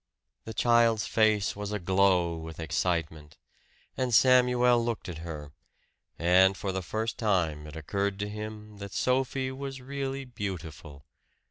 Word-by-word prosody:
The 110 Hz, -, -6 dB
child's 115 Hz, -2 st, +3 dB
face 110 Hz, -2 st, +2 dB
was 105 Hz, 0 st, -5 dB
aglow 95 Hz, -3 st, +2 dB
with 80 Hz, 0 st, -8 dB
excitement; 80 Hz, -2 st, -2 dB, 0.6 s
and 130 Hz, -1 st, -1 dB
Samuel 125 Hz, -1 st, +5 dB
looked 115 Hz, -1 st, -3 dB
at 85 Hz, -3 st, -6 dB
her, 75 Hz, -3 st, -7 dB, 0.7 s
and 95 Hz, +3 st, +4 dB
for 100 Hz, -, -3 dB
the 95 Hz, 0 st, -3 dB
first 110 Hz, +5 st, -3 dB
time 85 Hz, -9 st, 0 dB
it 75 Hz, -, -10 dB
occurred 100 Hz, +5 st, -2 dB
to 105 Hz, 0 st, -3 dB
him 105 Hz, 0 st, -8 dB
that 100 Hz, -1 st, -8 dB
Sophie 130 Hz, +1 st, 0 dB
was 135 Hz, 0 st, -6 dB
really 135 Hz, +1 st, -4 dB
beautiful. 80 Hz, -, -7 dB
100 Hz, 135 wpm, -28 LUFS, 85-120 Hz, 0.7 s, Samuel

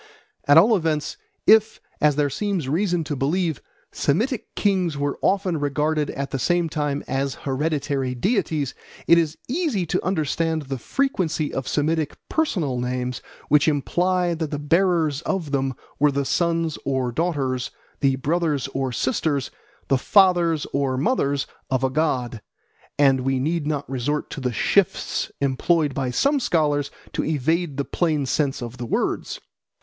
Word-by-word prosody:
At 145 Hz, +2 st, +7 dB
all 215 Hz, +7 st, +7 dB
events, 160 Hz, -5 st, -1 dB, 0.3 s
if, 220 Hz, 0 st, +5 dB, 0.2 s
as 150 Hz, -1 st, +4 dB
there 145 Hz, -1 st, +1 dB
seems 190 Hz, -1 st, -2 dB
reason 175 Hz, +3 st, +1 dB
to 150 Hz, -1 st, -3 dB
believe, 160 Hz, +3 st, 0 dB, 0.3 s
Semitic 220 Hz, -, -1 dB
kings 185 Hz, -7 st, +1 dB
were 145 Hz, 0 st, -2 dB
often 190 Hz, -5 st, +1 dB
regarded 150 Hz, +1 st, 0 dB
at 140 Hz, 0 st, -4 dB
the 135 Hz, -, -2 dB
same 175 Hz, +3 st, +1 dB
time 145 Hz, -2 st, -2 dB
as 135 Hz, +1 st, -1 dB
hereditary 140 Hz, -2 st, -1 dB
deities, 160 Hz, -, 0 dB, 0.3 s
it 170 Hz, -, +6 dB
is 160 Hz, -2 st, -1 dB
easy 265 Hz, -, 0 dB
to -, -, -1 dB
understand 160 Hz, -2 st, 0 dB
the 135 Hz, -1 st, -5 dB
frequency 175 Hz, -, -1 dB
of 135 Hz, -, -3 dB
Semitic 155 Hz, +1 st, 0 dB
personal 170 Hz, -, 0 dB
names 125 Hz, 0 st, -2 dB, 0.3 s
which 150 Hz, +2 st, +4 dB
imply 175 Hz, +4 st, +1 dB
that 160 Hz, -2 st, -3 dB
the 145 Hz, -, -3 dB
bearers 160 Hz, -1 st, +2 dB
of 175 Hz, -7 st, -2 dB
them 135 Hz, -2 st, 0 dB, 0.2 s
were 145 Hz, 0 st, +4 dB
the 140 Hz, 0 st, -1 dB
sons 165 Hz, 0 st, 0 dB
or 130 Hz, -2 st, -1 dB
daughters, 135 Hz, -5 st, -1 dB, 0.3 s
the 135 Hz, -2 st, +3 dB
brothers 150 Hz, 0 st, 0 dB
or 135 Hz, -1 st, -2 dB
sisters, 135 Hz, +3 st, -1 dB, 0.4 s
the 135 Hz, -2 st, +2 dB
fathers 175 Hz, -4 st, +4 dB
or 135 Hz, -2 st, 0 dB
mothers 140 Hz, -, +1 dB, 0.2 s
of 130 Hz, 0 st, 0 dB
a 130 Hz, -, +1 dB
god, 125 Hz, -6 st, -1 dB, 0.6 s
and 135 Hz, -2 st, +4 dB
we 135 Hz, +1 st, 0 dB
need 155 Hz, +2 st, -1 dB
not 145 Hz, -2 st, -2 dB
resort 135 Hz, +3 st, -2 dB
to 140 Hz, -, -6 dB
the 125 Hz, -1 st, -1 dB
shifts 190 Hz, -, +1 dB
employed 145 Hz, +2 st, +1 dB
by 130 Hz, -1 st, -1 dB
some 280 Hz, -, +2 dB
scholars 145 Hz, -, +1 dB, 0.2 s
to -, -, -1 dB
evade 160 Hz, +1 st, 0 dB
the 140 Hz, -, -1 dB
plain 155 Hz, -5 st, 0 dB
sense 135 Hz, -1 st, 0 dB
of 120 Hz, +1 st, -7 dB
the 120 Hz, -, -5 dB
words. -, -, -1 dB
150 Hz, 155 wpm, -23 LUFS, 135-170 Hz, 0.6 s, At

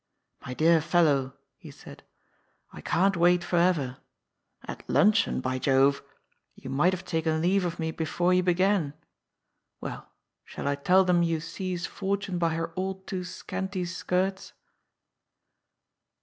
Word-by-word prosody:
^' -, -, -13 dB
My 125 Hz, -, -5 dB
dear 165 Hz, +2 st, +4 dB
fellow," 150 Hz, -5 st, +2 dB, 0.2 s
he -, -, -12 dB
said, -, -, -13 dB, 0.4 s
" -, -, -37 dB
I -, -, -10 dB
can't 195 Hz, +2 st, +1 dB
wait 175 Hz, +1 st, +3 dB
for 175 Hz, -, -1 dB
ever. 160 Hz, -8 st, +1 dB, 0.7 s
At -, -, -7 dB
luncheon, 210 Hz, -8 st, +3 dB
by 130 Hz, 0 st, -2 dB
Jove 135 Hz, +1 st, +3 dB
I -, -, -31 dB, 0.4 s
You -, -, -9 dB
might 150 Hz, +7 st, +3 dB
have 185 Hz, 0 st, -5 dB
taken 160 Hz, -2 st, -1 dB
leave 180 Hz, +3 st, +2 dB
of 170 Hz, -1 st, -3 dB
me 160 Hz, -1 st, -2 dB
before 175 Hz, +3 st, 0 dB
you 180 Hz, -, +4 dB
be 180 Hz, -1 st, +1 dB
gan. 185 Hz, -6 st, +1 dB, 0.8 s
Well, -, -, -7 dB, 0.3 s
shall -, -, -7 dB
I 140 Hz, -, +2 dB
tell 180 Hz, +7 st, +3 dB
them 180 Hz, -1 st, +3 dB
you 165 Hz, -1 st, +1 dB
seize 180 Hz, +2 st, -4 dB
Fortune 195 Hz, -2 st, -3 dB
by 165 Hz, -2 st, +1 dB
her 165 Hz, 0 st, -2 dB
all 190 Hz, +1 st, -2 dB
too 190 Hz, -1 st, -5 dB
scanty 185 Hz, +1 st, -5 dB
skirts?" 185 Hz, +2 st, -2 dB
175 Hz, 155 wpm, -27 LUFS, 160-185 Hz, 0.8 s, dear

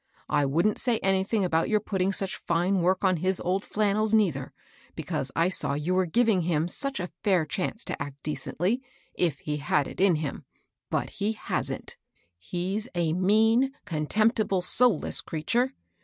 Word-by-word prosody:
I 145 Hz, -2 st, +2 dB
wouldn't 170 Hz, +10 st, +2 dB
say 240 Hz, -2 st, +2 dB
anything 195 Hz, +2 st, +2 dB
about 165 Hz, -2 st, +1 dB
your 215 Hz, -1 st, +3 dB
putting 195 Hz, -2 st, -1 dB
such 195 Hz, 0 st, -2 dB
fine 180 Hz, +3 st, +2 dB
work 185 Hz, +3 st, +1 dB
on 185 Hz, -2 st, +3 dB
his 185 Hz, +3 st, 0 dB
old 190 Hz, +3 st, -1 dB
flannels, 215 Hz, +1 st, +1 dB
neitiier, 165 Hz, -12 st, +1 dB, 0.5 s
because 135 Hz, -, -3 dB
I 165 Hz, +1 st, +3 dB
saw 185 Hz, -6 st, 0 dB
you 150 Hz, +5 st, -1 dB
were 185 Hz, -1 st, +2 dB
giving 220 Hz, +1 st, +3 dB
him 165 Hz, -1 st, 0 dB
such 275 Hz, +8 st, -2 dB
a 180 Hz, 0 st, -4 dB
&ir 185 Hz, -6 st, +3 dB
chance 185 Hz, +8 st, -3 dB
to -, -, -5 dB
act 145 Hz, -1 st, -5 dB
decently, 180 Hz, -, -1 dB, 0.3 s
if 165 Hz, -6 st, 0 dB
he 150 Hz, -1 st, -3 dB
had 145 Hz, 0 st, +1 dB
it -, -, -6 dB
in 190 Hz, -3 st, +5 dB
him. 150 Hz, -3 st, -4 dB, 0.4 s
But -, -, -1 dB
he 205 Hz, +2 st, -1 dB
hasn't. 215 Hz, -, -4 dB, 0.4 s
He's 190 Hz, -, -3 dB
a 165 Hz, -2 st, +1 dB
mean, 220 Hz, +8 st, +3 dB
contemptible, 205 Hz, -, +1 dB
soulless 245 Hz, +5 st, +3 dB
creature! 235 Hz, -, -1 dB
185 Hz, 165 wpm, -27 LUFS, 165-215 Hz, 0.5 s, in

